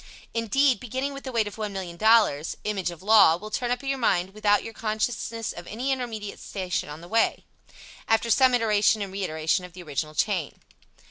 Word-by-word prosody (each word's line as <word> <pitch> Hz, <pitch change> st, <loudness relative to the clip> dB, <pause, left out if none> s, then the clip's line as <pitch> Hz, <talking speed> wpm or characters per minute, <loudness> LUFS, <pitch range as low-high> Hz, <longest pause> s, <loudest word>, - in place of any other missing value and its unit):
Indeed, 250 Hz, +4 st, +2 dB
beginning 260 Hz, +3 st, -3 dB
with 275 Hz, 0 st, -9 dB
the 260 Hz, -, -4 dB
weight 230 Hz, -3 st, +1 dB
of 205 Hz, -, -7 dB
$1,000,000, 195 Hz, -4 st, +2 dB
"image 200 Hz, -4 st, -1 dB
of 175 Hz, 0 st, -10 dB
law" 205 Hz, -6 st, +7 dB
will 210 Hz, +5 st, -9 dB
turn 245 Hz, +2 st, -1 dB
up 245 Hz, +2 st, -1 dB
in 270 Hz, -, -3 dB
your 275 Hz, -1 st, -1 dB
mind 190 Hz, -5 st, +1 dB
without 205 Hz, -1 st, +2 dB
your 225 Hz, -, -7 dB
consciousness 225 Hz, +1 st, -2 dB
of 175 Hz, -, -10 dB
any 250 Hz, +6 st, -2 dB
intermediate 225 Hz, -6 st, -4 dB
station 185 Hz, -6 st, -3 dB
on 150 Hz, +2 st, -8 dB
the 170 Hz, -, -11 dB
way, 225 Hz, +4 st, +1 dB, 0.6 s
after 225 Hz, +1 st, +2 dB
some 260 Hz, +1 st, +5 dB
iteration 215 Hz, -2 st, +2 dB
and 195 Hz, -1 st, -8 dB
reiteration 170 Hz, -2 st, -1 dB
of 180 Hz, -1 st, -10 dB
the 180 Hz, 0 st, -10 dB
original 155 Hz, 0 st, -4 dB
chain. 180 Hz, -3 st, 0 dB
215 Hz, 190 wpm, -26 LUFS, 180-230 Hz, 0.6 s, law